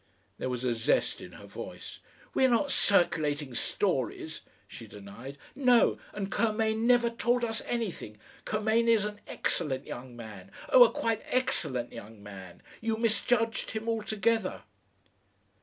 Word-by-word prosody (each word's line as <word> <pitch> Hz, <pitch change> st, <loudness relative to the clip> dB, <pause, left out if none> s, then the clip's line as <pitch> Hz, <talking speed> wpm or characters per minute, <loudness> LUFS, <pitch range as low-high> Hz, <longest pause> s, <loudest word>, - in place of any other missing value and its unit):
There -, -, -2 dB
was 125 Hz, -1 st, -3 dB
a 125 Hz, -2 st, +1 dB
zest 115 Hz, 0 st, +1 dB
in -, -, -10 dB
her -, -, -12 dB
voice. -, -, -8 dB, 0.3 s
"We're 260 Hz, -, +4 dB
not 250 Hz, +4 st, +2 dB
circulating 150 Hz, -7 st, +2 dB
stories," 115 Hz, -, -1 dB, 0.3 s
she -, -, -10 dB
denied. 105 Hz, +7 st, -10 dB, 0.2 s
"No! 250 Hz, -3 st, +4 dB
And 200 Hz, -1 st, -4 dB
Curmain 220 Hz, 0 st, +1 dB
never 240 Hz, -1 st, +4 dB
told 240 Hz, +1 st, +1 dB
us 225 Hz, -1 st, -2 dB
anything 205 Hz, -, -3 dB, 0.3 s
Curmain 220 Hz, +2 st, +1 dB
is 225 Hz, -3 st, +4 dB
an 210 Hz, 0 st, -6 dB
EXCELLENT 130 Hz, -3 st, -1 dB
young 125 Hz, 0 st, -8 dB
man; 105 Hz, -5 st, -10 dB, 0.2 s
oh! 250 Hz, -1 st, +9 dB
a 230 Hz, -, +1 dB
quite 225 Hz, -1 st, -1 dB
excellent 130 Hz, -, 0 dB
young 110 Hz, -2 st, -10 dB
man. 95 Hz, -4 st, -11 dB, 0.2 s
You 225 Hz, -1 st, 0 dB
misjudged 230 Hz, 0 st, +1 dB
him 220 Hz, +1 st, -4 dB
altogether."... 225 Hz, 0 st, 0 dB
215 Hz, 140 wpm, -29 LUFS, -, 0.3 s, oh